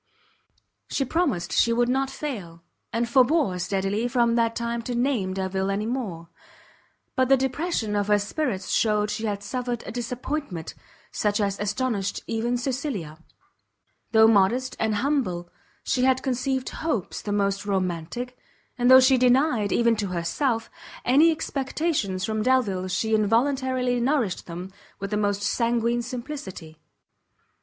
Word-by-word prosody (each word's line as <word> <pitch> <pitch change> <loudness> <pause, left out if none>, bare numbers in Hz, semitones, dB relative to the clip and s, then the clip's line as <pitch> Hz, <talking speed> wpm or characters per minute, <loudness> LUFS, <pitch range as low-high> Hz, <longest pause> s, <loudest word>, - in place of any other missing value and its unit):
She 275 - 0
promised 230 - 0
she 230 - +3
would 240 +1 +2
not 265 +2 +1
fail; 190 - -6 0.3
and 235 +1 0
forbore 260 - +3
steadily 195 +5 -1
from 235 -1 +2
that 230 -1 +1
time 235 0 -2
to 245 +1 -4
name 235 -7 0
Delvile 190 0 -1
any 200 +2 -1
more: 205 -9 -4 0.9
but 260 0 +2
the 270 - +6
depression 265 -4 -1
of 205 -1 0
her 210 0 +4
spirits 205 -1 -2
shewed 210 -1 +2
she 220 +1 -2
had 205 -1 -3
suffered 245 +2 -3
a - - -6
disappointment 245 - -4 0.4
such 210 0 0
as 200 -1 -1
astonished 205 -1 -1
even 235 +2 -1
Cecilia. 245 - -3 0.9
Though 220 -1 +7
modest 225 +5 +3
and 220 -1 +1
humble, 205 -10 -1 0.3
she 250 - 0
had 260 0 +3
conceived 260 0 -1
hopes 310 - -3
the 205 - -4
most 200 0 0
romantic, 190 +6 -2 0.4
and 245 +1 +3
though 260 0 +10
she 260 0 +5
denied, 250 -4 +3
even 235 -1 +3
to 205 -1 -1
herself, 225 - -1 0.3
any 290 +7 +6
expectations 275 - -1
from 220 -1 -1
Delvile, 215 -7 +1
she 220 +4 -1
involuntarily 250 +3 +1
nourished 245 -6 0
them 180 +2 -7 0.3
with 200 +1 -5
the 210 - +1
most 205 -1 0
sanguine 235 +2 +1
simplicity. 235 - -7
230 Hz, 140 wpm, -25 LUFS, 200-255 Hz, 0.9 s, though